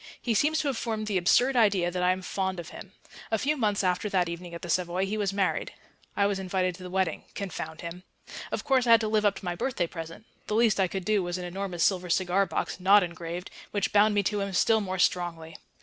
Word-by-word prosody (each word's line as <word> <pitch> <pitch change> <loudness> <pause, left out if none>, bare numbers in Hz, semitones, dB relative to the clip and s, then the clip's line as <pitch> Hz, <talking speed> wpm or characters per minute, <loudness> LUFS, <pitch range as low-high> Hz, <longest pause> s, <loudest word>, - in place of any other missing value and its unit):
He 235 - -1
seems 300 +8 +2
to 295 - -2
have 265 -5 -1
formed 220 -2 -3
the 205 -3 0
absurd 245 +9 +3
idea 200 -7 +3
that 180 0 -2
I 180 - +3
am 185 0 -3
fond 190 0 -2
of 170 - -7
him. - - -11 0.4
A 220 - +1
few 295 +7 0
months 210 -7 0
after 185 +3 0
that 185 -3 +1
evening 170 0 -6
at 170 - -9
the - - -5
Savoy 180 +2 0
he 200 +2 -3
was 205 -3 0
married. 195 -1 -1 0.4
I 200 - +3
was 200 -1 0
invited 185 -1 -1
to 180 - -13
the 180 - -7
wedding 185 -3 -1
confound 160 -5 -5
him. 170 +1 -7 0.5
Of - - -2
course 260 -3 +2
I - - +5
had 230 - +6
to 220 - -1
live 215 0 +1
up 200 -1 +3
to - - -9
my 175 - -1
birthday 180 0 -1
present; 165 +3 -8 0.2
the 210 - -1
least 225 -3 +3
I 190 - +3
could 190 0 -5
do 215 -2 +2
was 175 0 -3
an 180 - -5
enormous 180 -1 -3
silver 180 -2 +1
cigar 185 +2 +2
box - - -3
(not 195 +2 +6
engraved), 170 +1 -6 0.2
which 205 -1 -1
bound 210 +1 +5
me 205 - +3
to 210 +2 -1
him 195 -1 -3
still 220 +4 +3
more 190 -2 -3
strongly. 170 -3 0
190 Hz, 250 wpm, -27 LUFS, 175-210 Hz, 0.5 s, had